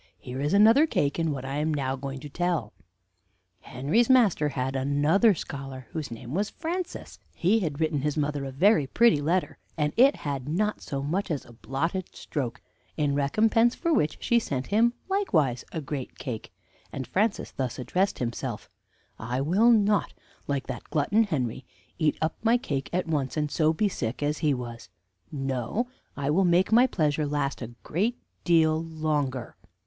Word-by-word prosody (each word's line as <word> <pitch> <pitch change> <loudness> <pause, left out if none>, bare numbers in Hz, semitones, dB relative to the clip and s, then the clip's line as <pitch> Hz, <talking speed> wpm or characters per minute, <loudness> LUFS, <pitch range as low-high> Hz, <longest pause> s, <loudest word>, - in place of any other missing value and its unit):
Here 125 +7 -6
is 145 - 0
another 225 +10 +6
cake 145 - 0
in 165 -2 +1
what 135 -2 -4
I 135 +1 -3
am 155 +2 0
now 135 -3 -1
going 135 0 -6
to 150 - -7
tell. 165 - -1 0.9
"Henry's 145 - 0
master 215 - +4
had 135 -1 -2
another 145 - +3
scholar, 135 -4 -7
whose 155 -3 -4
name 115 +2 -8
was 200 +5 0
Francis. 345 +3 -5 0.2
He 200 +6 +3
had 155 -7 -3
written 155 -3 0
his 150 +2 -1
mother 145 -1 -1
a 135 - -5
very 155 +1 +3
pretty 215 - +4
letter, 155 -1 0 0.2
and 150 -1 0
it 270 +4 +6
had 140 -2 -4
not 210 +6 0
so 135 -1 -4
much 185 +8 -1
as 150 -5 -2
a 120 - -15
blotted 165 - -3
stroke; 130 -6 -4 0.3
in 145 -2 +1
recompense 220 - +3
for 335 -1 0
which 150 - +1
she 235 - +3
sent 135 - -3
him 230 +3 +3
likewise 165 - +1
a 165 - -3
great 140 -2 -6
cake, 120 -6 -6 0.4
and 130 - -5
Francis 205 - 0
thus 130 -3 -3
addressed 185 +10 0
himself: 120 -1 -4 0.5
'I 120 +4 -2
will 190 +11 +4
not, 210 -4 +3 0.3
like 140 -2 -1
that - - -6
glutton 195 +9 +2
Henry, 130 - -2 0.4
eat 155 -3 +2
up 160 - -1
my 230 +2 +4
cake 140 - -3
at 180 +1 0
once, 145 -3 -1
and 150 -1 -1
so 155 -1 +3
be 205 +6 +1
sick 125 - -3
as 150 +1 0
he 150 - +2
was; 120 -3 -5 0.4
no, 135 - -2 0.3
I 140 0 0
will 190 +5 +3
make 180 +3 +3
my 245 +3 +6
pleasure 150 - 0
last 145 -2 -2
a 120 0 -7
great 215 +9 -1 0.3
deal 160 -2 +3
longer.' 150 -6 -2
150 Hz, 175 wpm, -27 LUFS, 135-195 Hz, 0.9 s, another